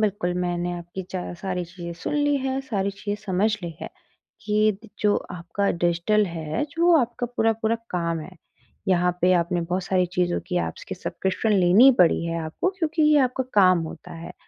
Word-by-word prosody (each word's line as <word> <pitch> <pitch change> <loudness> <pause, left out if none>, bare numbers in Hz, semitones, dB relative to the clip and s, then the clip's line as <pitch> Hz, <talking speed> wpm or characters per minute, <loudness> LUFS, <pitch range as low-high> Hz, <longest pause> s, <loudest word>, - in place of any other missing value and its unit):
बिल्कुल, 205 -4 0
मैंने 175 0 -1
आपकी 175 +2 -6
चा 185 -1 -4
सारी 180 0 -3
चीज़ें 170 0 -8
सुन - - -2
ली 290 -1 +2
हैं, 265 0 -2
सारी 205 -7 -2
चीज़ें 205 +1 -4
समझ 195 +3 +1
ली 170 - -4
हैं - - -5 0.6
कि 215 +1 +3
त - - -12
जो 210 -1 +3 0.2
आपका 180 +3 -2
डिजिटल 175 +5 +1
है, 160 - -3
जो 340 +3 +3
आपका 245 -1 -1
पूरा-पूरा 225 -2 0 0.2
काम 170 -2 -1
है, 185 +4 -11 0.5
यहाँ 180 -1 +3
पे 180 +1 +4
आपने 175 0 +1
बहुत 180 +3 -2
सारी 180 -1 +1
चीज़ों 175 -1 +1
की, 180 - -1
ऐप्स - - -5
की - - -3
सब्सक्रिप्शन 190 +4 -2
लेनी 195 +9 +7
पड़ी 170 -1 +4
है 165 0 -2
आपको 160 - -2
क्योंकि 325 -1 0
ये 300 -1 +5
आपका 255 0 0
काम 185 -3 +6
होता - - -11
है। 165 0 -8
185 Hz, 185 wpm, -24 LUFS, 175-220 Hz, 0.6 s, लेनी